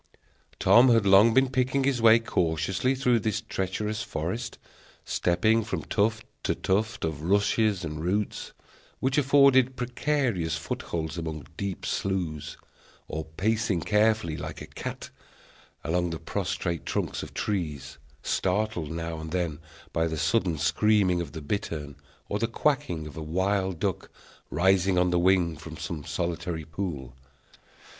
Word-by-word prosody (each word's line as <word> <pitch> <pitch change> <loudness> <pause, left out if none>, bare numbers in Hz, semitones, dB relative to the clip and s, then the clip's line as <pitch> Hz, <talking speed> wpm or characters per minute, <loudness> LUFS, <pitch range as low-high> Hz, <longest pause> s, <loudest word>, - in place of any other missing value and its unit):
Tom 125 +2 +6
had 115 -3 +4
long 100 +4 +7
been 130 +2 +3
picking 130 +1 +1
his 130 -3 +1
way 115 0 +8
cautiously 90 - 0
through 125 -3 +2
this 110 0 -1
treacherous 105 0 -3
forest, 90 +10 -4 0.5
stepping 110 +6 +2
from 110 - -3
tuft 110 +1 0 0.2
to - - 0
tuft 105 0 0
of 80 -2 -3
rushes 100 +1 +2
and 75 0 -5
roots, 100 +4 -1 0.5
which 130 +2 +2
afforded 135 -2 +5
precarious 125 - -1
footholds 80 0 -4
among 80 -3 -5
deep 100 -1 -4
sloughs, 90 -6 -2 0.5
or 80 0 -4
pacing 110 -3 +1
carefully, 105 -4 +2
like - - -6
a - - -7
cat, - - -7 0.7
along 85 +3 0
the 80 - -4
prostrate 85 -1 -3
trunks - - -2
of - - -9
trees, 85 -9 -3 0.2
startled 95 -4 0
now 80 0 -4
and 80 0 -6
then 85 -3 -2 0.3
by 80 0 +1
the 80 0 -3
sudden 85 +1 +1
screaming 95 +1 +2
of 75 -5 -7
the 80 - -7
bittern, 75 -4 -3 0.3
or 105 - -2
the 115 - +1
quacking 130 - 0
of 75 - -9
a - - -4
wild 95 +2 0
duck, - - -2 0.4
rising 95 +2 +3
on 90 0 +3
the 90 - +3
wing 90 -2 +3
from 80 +1 -9
some 80 -2 -5
solitary 85 0 -3
pool. 80 -6 -5
95 Hz, 140 wpm, -27 LUFS, 80-110 Hz, 0.7 s, way